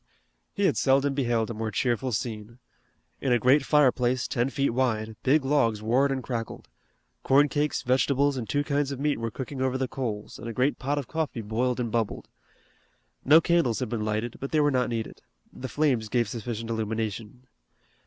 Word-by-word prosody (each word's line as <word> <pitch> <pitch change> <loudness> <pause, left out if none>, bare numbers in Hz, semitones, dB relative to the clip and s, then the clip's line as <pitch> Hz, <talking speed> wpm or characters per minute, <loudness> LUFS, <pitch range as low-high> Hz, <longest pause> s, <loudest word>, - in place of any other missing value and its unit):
He 200 - +1
had - - +2
seldom 135 +1 +3
beheld 120 -4 0
a - - -3
more 110 0 -3
cheerful 125 0 -1
scene. 110 0 -4 0.6
In 135 - -1
a 120 - +5
great 130 +5 +4
fireplace 130 -4 +2
ten 120 +2 0
feet 140 -1 0
wide 110 -3 -1
big 135 +1 +3
logs 115 -7 +1
roared 130 +5 +2
and 130 -2 -2
crackled. 115 -2 -5 0.5
Corn 140 +2 +4
cakes, 145 0 -1
vegetables, 140 +2 +2
and 120 -4 -5
two 145 0 +1
kinds 145 -1 0
of 135 - -5
meat 145 -2 0
were 115 0 -2
cooking 130 +3 -6
over 130 0 0
the 130 0 -1
coals 110 -6 -5
and 115 - -7
a 115 - -4
great 130 +6 0
pot 140 +2 -1
of 140 -4 -3
coffee 155 -7 -3
boiled 120 +4 -1
and 120 -2 -2
bubbled. 115 -2 -2 0.9
No 150 +4 +7
candles 165 -8 +1
had 130 - -3
been 115 -3 -2
lighted, 110 +2 -2
but 135 - -4
they 155 - +2
were 145 -1 +3
not 125 -2 +1
needed. 115 -2 -4 0.3
The 130 - -7
flames 130 -8 +1
gave 120 -1 +1
sufficient 115 +1 -5
illumination. 110 +1 -4
125 Hz, 190 wpm, -27 LUFS, 115-140 Hz, 0.9 s, No